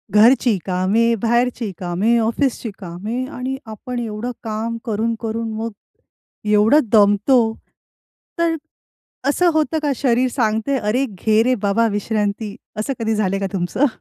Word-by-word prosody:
घरची 230 0 +5
कामे, 195 +6 +2
बाहेरची 235 -1 +1
कामे, 185 +6 +1
ऑफिसची 235 +1 0
कामे. 200 +7 -4
आणि 260 +1 -4
आपण 240 +3 -6
एवढं 225 +1 -4
काम 225 +1 -3
करून-करून, 225 0 -2
मग 225 +1 -3 0.8
एवढं 210 +8 +5
दमतो, 210 +4 +5 1.0
तर 335 -1 +2 0.7
असं 350 +4 +3
होतं 315 0 +1
का 290 -2 +1
शरीर 255 0 +2
सांगतंय, 230 +2 0
"अरे, 230 +6 0
घे 215 +1 +1
रे 255 +2 +2
बाबा 210 +3 +2
विश्रांती." 205 0 -2 0.3
असं 275 +6 -1
कधी 225 -1 0
झालंय 195 -2 0
का 195 - 0
तुमचं? 190 +10 +1
225 Hz, 130 wpm, -20 LUFS, 210-250 Hz, 1.0 s, घरची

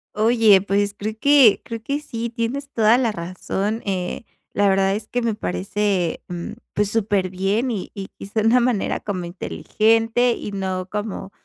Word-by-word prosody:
Oye, 220 -3 +5
pues, 200 0 0
creo 215 +2 -3
que 280 -7 +6
creo 230 -1 -6
que 280 +4 -1
sí, 235 -5 -5
tienes 250 +4 -3
toda 225 +1 +4
la 240 -4 +1
razón. 195 +4 -3
Eh, 185 +2 -3 0.3
la 205 0 +3
verdad 195 0 +2
es 215 0 -6
que 245 - -2
me 230 -2 0
parece, 175 - -1
mm, 175 -1 -6 0.2
pues, 205 -1 +1
superbién, 200 +2 0
y 200 -5 -4
y 195 -2 -6
quizá 205 +3 -3
de 220 - +2
una 250 +2 +5
manera 240 -5 0
como 185 -4 -4
inteligente, 225 +6 +1
y 210 - -4
no 190 -2 -3
como 210 -1 -5
210 Hz, 170 wpm, -22 LUFS, 195-230 Hz, 0.3 s, que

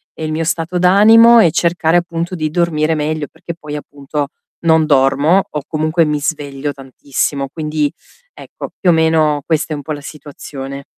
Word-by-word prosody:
ehm, 160 - -5
il 155 - -3
mio 160 +1 -1
stato 165 +2 -2
d'animo 225 +6 +7
e 170 -7 +5
cercare 170 0 +1
appunto 170 0 -3
di 155 -3 -2
dormire 160 -1 0
meglio, 155 -1 -2
perché 170 - -8
poi, 150 -3 -8
appunto, 145 0 -5 0.4
non 160 -1 +4
dormo 140 +6 +3
o 150 - -5
comunque 155 +1 +1
mi 150 -1 -1
sveglio 145 -1 -3
tantissimo. 135 +1 -3
Quindi, 150 -1 -2 0.4
ecco, - - -9
più 185 - +2
o - - +6
meno 160 -2 +2
questa 160 -1 -1
è - - -2
un 145 - -7
po' 155 - -6
la 145 -1 -4
situazione. 140 -2 -9
155 Hz, 175 wpm, -16 LUFS, 145-165 Hz, 0.4 s, d'animo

